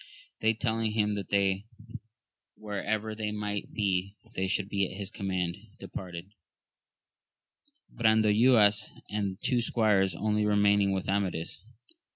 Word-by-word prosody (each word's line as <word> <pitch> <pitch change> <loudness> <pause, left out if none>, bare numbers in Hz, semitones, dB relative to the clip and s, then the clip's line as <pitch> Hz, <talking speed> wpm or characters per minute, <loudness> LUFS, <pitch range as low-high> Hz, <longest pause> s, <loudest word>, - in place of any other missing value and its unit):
They 110 0 +2
telling 110 -1 -1
him 105 -1 +1
that 100 -1 +1 0.9
wherever 110 +1 -3
they 105 -1 -3
might 105 -1 -4
be 100 -2 -1 0.2
they 95 -2 -1
should 95 +1 0
be 100 -2 0
at 95 - -9
his 100 -2 -5
command, 90 -3 -2 0.2
departed; 90 0 -8 1.6
Brandoynas 110 -1 +4 0.2
and 100 -2 -2
two 125 -2 +1
squires 105 -6 +2
only 105 +3 0
remaining 100 -1 +3
with 95 -1 -2
Amadis. 95 -1 -2
105 Hz, 115 wpm, -29 LUFS, 95-110 Hz, 1.6 s, Brandoynas